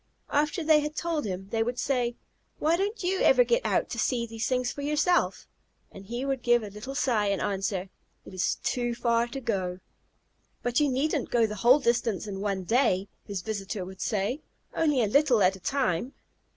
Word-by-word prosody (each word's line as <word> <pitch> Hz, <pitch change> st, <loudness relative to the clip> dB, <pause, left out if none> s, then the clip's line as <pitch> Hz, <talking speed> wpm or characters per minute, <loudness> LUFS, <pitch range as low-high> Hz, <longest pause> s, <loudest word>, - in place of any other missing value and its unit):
After 300 Hz, +4 st, +1 dB
they 310 Hz, -1 st, +5 dB
had 300 Hz, +1 st, -4 dB
told 330 Hz, -4 st, -1 dB
him, 190 Hz, -1 st, -5 dB
they 225 Hz, -1 st, 0 dB
would 245 Hz, +2 st, -1 dB
say, 245 Hz, -3 st, 0 dB, 0.4 s
"Why, 320 Hz, +2 st, +2 dB
don't 400 Hz, +4 st, -2 dB
you 375 Hz, +1 st, 0 dB
ever -, -, +6 dB
get 485 Hz, +1 st, +1 dB
out -, -, +1 dB
to -, -, -3 dB
see 240 Hz, -3 st, 0 dB
these 225 Hz, 0 st, -3 dB
things 250 Hz, -1 st, 0 dB
for 285 Hz, -, -7 dB
yourself?" 300 Hz, +5 st, +1 dB, 0.4 s
and 195 Hz, 0 st, -12 dB
he 240 Hz, +4 st, -3 dB
would 270 Hz, -2 st, -1 dB
give 240 Hz, -1 st, +3 dB
a 205 Hz, -, -7 dB
little 230 Hz, +7 st, -7 dB
sigh 225 Hz, -7 st, +1 dB
and 200 Hz, -1 st, 0 dB
answer, 195 Hz, -1 st, -2 dB, 0.4 s
"It -, -, -11 dB
is 185 Hz, -, 0 dB
too 240 Hz, -1 st, -1 dB
far 235 Hz, 0 st, +1 dB
to 270 Hz, +3 st, -6 dB
go." 190 Hz, -7 st, -2 dB, 0.8 s
"But 245 Hz, 0 st, +1 dB
you 295 Hz, -1 st, +3 dB
needn't 275 Hz, +1 st, 0 dB
go 235 Hz, -2 st, +3 dB
the 210 Hz, -1 st, -4 dB
whole 245 Hz, +4 st, +7 dB
distance 235 Hz, -5 st, 0 dB
in 195 Hz, -2 st, -5 dB
one 200 Hz, -2 st, -1 dB
day," 195 Hz, -2 st, +2 dB, 0.2 s
his 200 Hz, -3 st, -5 dB
visitor 200 Hz, -2 st, -4 dB
would 190 Hz, 0 st, -10 dB
say, 215 Hz, +7 st, -1 dB, 0.3 s
"only 295 Hz, -6 st, +2 dB
a -, -, +2 dB
little 250 Hz, -2 st, +4 dB
at 185 Hz, +1 st, +4 dB
a -, -, -12 dB
time." 255 Hz, -, -1 dB
240 Hz, 200 wpm, -27 LUFS, 200-285 Hz, 0.8 s, whole